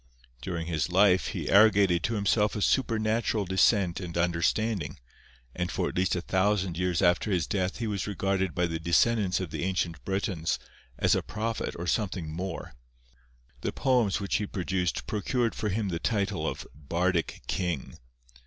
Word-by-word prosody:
During 85 Hz, +2 st, -3 dB
his 80 Hz, 0 st, -1 dB
life 95 Hz, 0 st, +4 dB
he -, -, -4 dB
arrogated 100 Hz, -4 st, +5 dB
to 115 Hz, -, -1 dB
himself 105 Hz, +1 st, +2 dB
a 105 Hz, -, -3 dB
supernatural 110 Hz, -3 st, +1 dB
descent 95 Hz, 0 st, +3 dB
and 85 Hz, -3 st, -5 dB
understanding, 85 Hz, +2 st, 0 dB, 0.6 s
and 90 Hz, -1 st, -2 dB
for -, -, -1 dB
at -, -, -9 dB
least 90 Hz, 0 st, +1 dB
a 90 Hz, -, -1 dB
thousand 95 Hz, -1 st, +1 dB
years 90 Hz, +1 st, 0 dB
after 90 Hz, +4 st, +3 dB
his 90 Hz, -4 st, +1 dB
death 95 Hz, -1 st, -1 dB
he 115 Hz, -, -3 dB
was 100 Hz, -4 st, -2 dB
regarded 95 Hz, -2 st, -1 dB
by 90 Hz, -1 st, +2 dB
the 80 Hz, -1 st, -3 dB
descendants 95 Hz, +4 st, +2 dB
of 90 Hz, -5 st, -5 dB
the -, -, -3 dB
ancient 90 Hz, -3 st, -2 dB
Britons 95 Hz, -4 st, -1 dB, 0.4 s
as -, -, +3 dB
a -, -, +2 dB
prophet 110 Hz, +1 st, -3 dB
or 85 Hz, -, -4 dB
something 90 Hz, -5 st, -1 dB
more. 95 Hz, +3 st, -5 dB, 0.9 s
The -, -, -1 dB
poems 125 Hz, -7 st, +2 dB
which 100 Hz, -1 st, 0 dB
he 105 Hz, -, -3 dB
produced 90 Hz, -2 st, -2 dB
procured 115 Hz, +3 st, -1 dB
for 105 Hz, -, -2 dB
him 105 Hz, 0 st, -1 dB
the 85 Hz, -2 st, -2 dB
title 100 Hz, -7 st, -1 dB
of -, -, -4 dB
"Bardic 85 Hz, +4 st, -1 dB
King." 85 Hz, -7 st, -3 dB
95 Hz, 165 wpm, -28 LUFS, 85-105 Hz, 0.9 s, arrogated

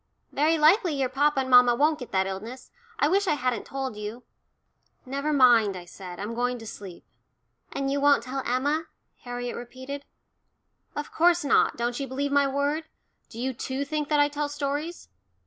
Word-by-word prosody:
Very 310 Hz, +3 st, +2 dB
likely 325 Hz, +2 st, +4 dB
your 265 Hz, -2 st, 0 dB
papa 285 Hz, 0 st, +2 dB
and 260 Hz, -, -4 dB
mamma 245 Hz, -1 st, +7 dB
won't 300 Hz, +4 st, +2 dB
get 250 Hz, -, -8 dB
that 190 Hz, 0 st, +2 dB
illness. 215 Hz, +7 st, -7 dB, 0.3 s
I 365 Hz, -, +3 dB
wish 390 Hz, +5 st, +2 dB
I 300 Hz, -, +3 dB
hadn't 250 Hz, -5 st, -2 dB
told 270 Hz, -4 st, -4 dB
you." 210 Hz, +4 st, -7 dB, 0.8 s
"Never 280 Hz, +3 st, -2 dB
mind," 240 Hz, -8 st, +5 dB
I 175 Hz, -, -9 dB
said. 180 Hz, 0 st, -10 dB
"I'm 210 Hz, +3 st, -4 dB
going 245 Hz, +1 st, -1 dB
to 225 Hz, -, -10 dB
sleep." 195 Hz, -4 st, -10 dB, 0.7 s
"And 275 Hz, 0 st, -2 dB
you 280 Hz, 0 st, 0 dB
won't 285 Hz, -4 st, +4 dB
tell 265 Hz, +2 st, -4 dB
Emma?" 290 Hz, +6 st, 0 dB, 0.4 s
Harriet 245 Hz, 0 st, -4 dB
repeated. 260 Hz, +4 st, -7 dB, 0.9 s
"Of 295 Hz, 0 st, -5 dB
course 345 Hz, -1 st, +3 dB
not 280 Hz, -, +3 dB
don't 240 Hz, +2 st, -2 dB
you 275 Hz, -, -3 dB
believe 280 Hz, +2 st, -2 dB
my 280 Hz, 0 st, +4 dB
word? 285 Hz, +3 st, -1 dB, 0.4 s
Do 230 Hz, -, -10 dB
you 260 Hz, +2 st, -1 dB
too 260 Hz, +3 st, -3 dB
think 300 Hz, 0 st, -3 dB
that 300 Hz, -1 st, +3 dB
I 290 Hz, -, +5 dB
tell 295 Hz, 0 st, -3 dB
stories?" 290 Hz, +4 st, -4 dB
270 Hz, 180 wpm, -26 LUFS, 245-290 Hz, 0.9 s, mamma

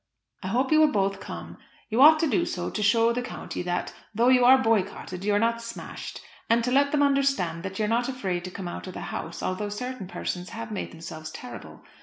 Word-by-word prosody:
I 185 Hz, -, -5 dB
hope 255 Hz, +8 st, 0 dB
you 310 Hz, -, +6 dB
will 310 Hz, -1 st, +5 dB
both 195 Hz, -1 st, 0 dB
come. -, -, -8 dB, 0.3 s
You 230 Hz, +3 st, +2 dB
ought 310 Hz, +2 st, +9 dB
to 325 Hz, -, +3 dB
do 340 Hz, +4 st, +2 dB
so 175 Hz, -, -3 dB
to 215 Hz, -, -3 dB
show 230 Hz, +3 st, +4 dB
the 245 Hz, -, -1 dB
county 245 Hz, -, -6 dB
that, 175 Hz, 0 st, -2 dB, 0.2 s
though 235 Hz, +3 st, +4 dB
you 255 Hz, -1 st, +5 dB
are 260 Hz, +2 st, +8 dB
boycotted, 205 Hz, -6 st, -1 dB
you 205 Hz, 0 st, +2 dB
are -, -, +4 dB
not 230 Hz, +2 st, +1 dB
smashed, 230 Hz, 0 st, -7 dB, 0.3 s
and 230 Hz, +1 st, +4 dB
to 250 Hz, -, 0 dB
let 280 Hz, +2 st, +4 dB
them 295 Hz, -1 st, +3 dB
understand 275 Hz, -12 st, +1 dB
that 190 Hz, +1 st, -6 dB
you 215 Hz, -, +1 dB
are -, -, -1 dB
not 235 Hz, +3 st, +1 dB
afraid 190 Hz, -9 st, -2 dB
to -, -, -5 dB
come 185 Hz, 0 st, -6 dB
out 175 Hz, -, -6 dB
of 185 Hz, -, -8 dB
the -, -, -5 dB
house 165 Hz, -, -5 dB
although 205 Hz, +3 st, -2 dB
certain 250 Hz, -1 st, -5 dB
persons 180 Hz, -1 st, -4 dB
have 230 Hz, 0 st, -7 dB
made 210 Hz, -, -3 dB
themselves 160 Hz, -1 st, -8 dB
terrible. 250 Hz, +9 st, -10 dB
225 Hz, 235 wpm, -26 LUFS, 185-255 Hz, 0.3 s, ought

